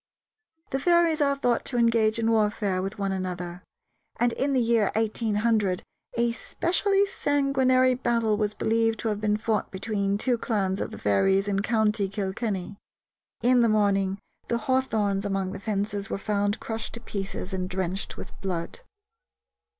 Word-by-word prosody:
The 270 - 0
fairies 340 0 +3
are 280 -1 +3
thought 245 -4 +1
to 245 - 0
engage 230 -2 +3
in 230 0 +1
warfare 210 -3 +1
with 195 +3 -4
one 195 -1 -1
another, 180 -2 -4 0.6
and 240 0 +3
in 280 +1 0
the 260 - +3
year 230 -3 +3
1800 215 -3 +1 0.3
a 235 0 +2
specially 390 - +1
sanguinary 270 -7 +2
battle 230 -3 +1
was 210 0 -1
believed 225 0 +1
to 225 - -1
have 210 -1 -2
been 210 -1 +1
fought 215 -1 -1
between 200 0 -1
two 240 +2 +1
clans 195 -5 -1
of - - -2
the - - -9
fairies 190 - +2
in 195 -1 0
county 215 -2 +1
Kilkenny. 200 0 -3 0.7
In 250 0 +5
the 230 - +4
morning 200 -2 +2 0.3
the 235 - 0
hawthorns 220 -6 0
along 195 -2 -1
the 195 - -6
fences 200 0 -2
were - - -2
found 205 0 -1
crushed 225 0 -5
to - - -6
pieces 195 -3 -5
and 185 -1 -2
drenched 190 0 -3
with - - -8
blood. 175 - -3
215 Hz, 160 wpm, -26 LUFS, 195-235 Hz, 0.7 s, In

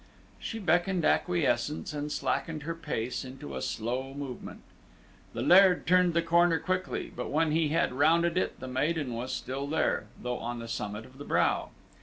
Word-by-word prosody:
She 225 - -5
beckoned 175 -2 +1
acquiescence, 160 -3 +1
and 150 0 -3
slackened 155 0 -2
her 165 +2 -3
pace 145 -8 -3
into 130 - -8
a 65 - -4
slow 125 - -3
movement. 140 -3 -7 0.7
The - - -3
Laird 185 0 +6
turned 180 -1 +4
the 170 - +3
corner 170 0 +4
quickly, 185 +3 -2
but 125 - -4
when 155 +1 +2
he 160 0 +2
had 150 -4 +1
rounded 165 +5 +3
it 185 - -1
the 130 - -6
maiden 140 +1 -1
was 120 +3 -4
still 135 +2 -4
there, 155 - 0
though 125 0 -3
on 120 +1 -4
the 115 0 -7
summit 105 -1 -4
of 130 +1 -17
the - - -6
brow. - - +1
150 Hz, 175 wpm, -29 LUFS, 130-170 Hz, 0.7 s, Laird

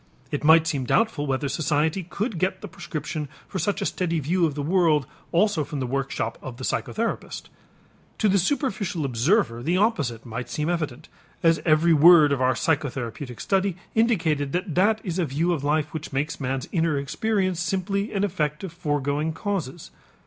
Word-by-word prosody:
It 145 - -2
might 160 +1 +6
seem 140 -5 -1
doubtful 185 - +1
whether 135 +1 -1
society 150 +4 0
could 190 +2 -4
get 185 +2 -1
the 210 - -6
prescription 155 -3 -5 0.2
for 190 - -4
such 205 +1 -1
a - - -2
steady 170 -3 -1
view 170 +4 +1
of 145 - -5
the 145 - -3
world 160 -3 +3 0.3
also 175 -2 +2
from 145 0 -5
the 130 - -1
workshop 135 -3 -2
of 125 -3 -8
the 130 - -8
psychotherapist. 230 - -3 0.7
To 215 - +2
the 200 0 +3
superficial 200 - -1
observer 125 - +1
the 170 +8 +1
opposite 155 - 0
might 120 +1 -5
seem 150 +2 -2
evident, 155 -8 -3 0.4
as 165 -1 +4
every 160 +2 +5
word 155 -1 +7
of 140 -2 0
our 130 0 +3
psychotherapeutic 135 -4 -2
study 195 -2 0 0.2
indicated 165 - +1
that 180 -1 -2
that 215 +5 +3
is 180 -2 -3
a 175 - +2
view 160 +5 0
of 145 -5 -3
life 150 0 0
which 155 -1 -6
makes 145 +4 -2
man's 130 0 -2
inner 165 -4 +1
experience 185 +5 -1
simply 195 +4 -1
an 200 -1 -1
effect 150 -6 -1
of 185 -4 -6
foregoing 145 -1 -1
causes. 175 -4 -4
160 Hz, 180 wpm, -25 LUFS, 145-185 Hz, 0.7 s, word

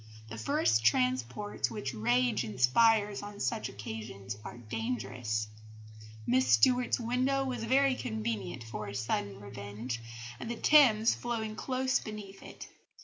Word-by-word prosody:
The 115 - -7
first 110 0 +2
transports 125 - +1
which 125 +3 -4
rage 120 +1 +2
inspires 205 - +3
on 205 0 -9
such 225 +1 -1
occasions 105 -1 -7
are - - -8
dangerous. 110 -1 -3 0.8
Miss 130 +2 +3
Stuart's 245 - +4
window 255 +3 +1
was 245 -4 -3
very 270 +2 +4
convenient 110 - -3
for 110 -2 -6
a 100 - -7
sudden 100 -2 -2
revenge, 105 +4 -6 0.4
the 235 +1 -3
Thames 230 -5 +5
flowing 225 -3 -3
close 260 +2 0
beneath 205 -2 -8
it. - - -10
125 Hz, 125 wpm, -31 LUFS, -, 0.8 s, Thames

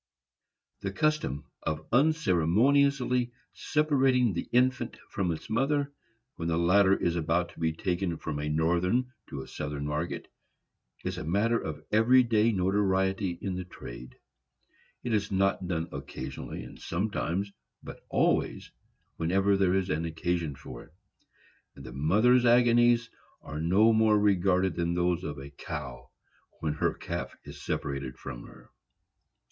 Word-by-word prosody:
The 100 - -3
custom 95 - 0 0.2
of 80 -1 -3
unceremoniously 125 - +3 0.2
separating 135 -7 +2
the 85 - -4
infant 125 -1 +1
from 95 -4 0
its 80 - -6
mother, 140 +4 0 0.4
when 85 - -3
the 80 -1 +1
latter 95 +3 +4
is 85 -1 0
about 85 +1 0
to - - -15
be 80 -1 +1
taken 90 0 -2
from 75 -2 -4
a 75 0 -2
Northern 90 +11 +1 0.2
to 70 - -5
a - - -13
Southern 75 +1 -5
market, 75 +3 -3 0.8
is - - -3
a - - -5
matter 105 +8 +1
of 75 -1 -6
every 120 +4 +5
day 115 -1 +3
notoriety 95 -1 +1
in 95 - -2
the 90 0 -4
trade. 60 -7 -10 0.9
It 120 - -2
is 105 -1 0
not 95 -1 +1
done 85 -2 -2
occasionally 65 0 -6
and - - -12
sometimes, 95 +1 -2 0.3
but - - -10
always, - - 0 0.5
whenever 95 +5 +2
there 95 -1 +2
is 95 -1 0
occasion 80 0 -2
for - - -10
it; 80 - -22 0.8
and 70 - -11
the 65 - -8
mother's 105 - +4
agonies 120 0 +5 0.4
are 75 +1 -5
no 100 +7 +4
more 110 -1 +4
regarded 95 -2 +2
than 85 0 0
those 90 0 +1
of 75 - -5
a 70 +1 -9
cow 65 -3 -7 0.5
when 75 -1 -1
her 75 - 0
calf - - -5
is - - -11
separated 70 -2 -3
from - - -8
her. - - -17
95 Hz, 140 wpm, -29 LUFS, 80-115 Hz, 0.9 s, every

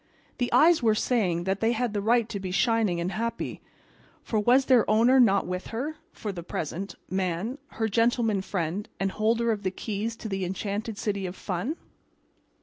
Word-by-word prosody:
The 245 - 0
eyes 330 0 +6
were 220 -2 +3
saying 195 -8 +1
that 190 +2 -1
they 225 +1 +2
had 235 -1 -1
the 205 - -1
right 230 +2 +3
to 200 - -4
be 190 -1 -5
shining 210 -2 +2
and 175 +2 -2
happy, 230 +3 -3 0.6
for 220 - 0
was 250 +5 +4
their 250 -4 +4
owner 235 +5 +5
not 200 -5 +4
with 180 +1 -4
her 285 +7 -4
(for 210 - -5
the 180 -3 -6
present) 170 +3 -4
Man, 190 - -2
her 220 0 0
Gentleman 230 -1 +2
Friend 190 +1 -3
and 195 0 0
holder 230 +3 +1
of 210 -2 -2
the 190 - 0
keys 215 +3 -4
to 225 - -7
the 195 -2 -2
enchanted 200 +4 -3
city 200 -3 -2
of 180 - -7
fun? 195 - -3
215 Hz, 185 wpm, -27 LUFS, 190-230 Hz, 0.6 s, eyes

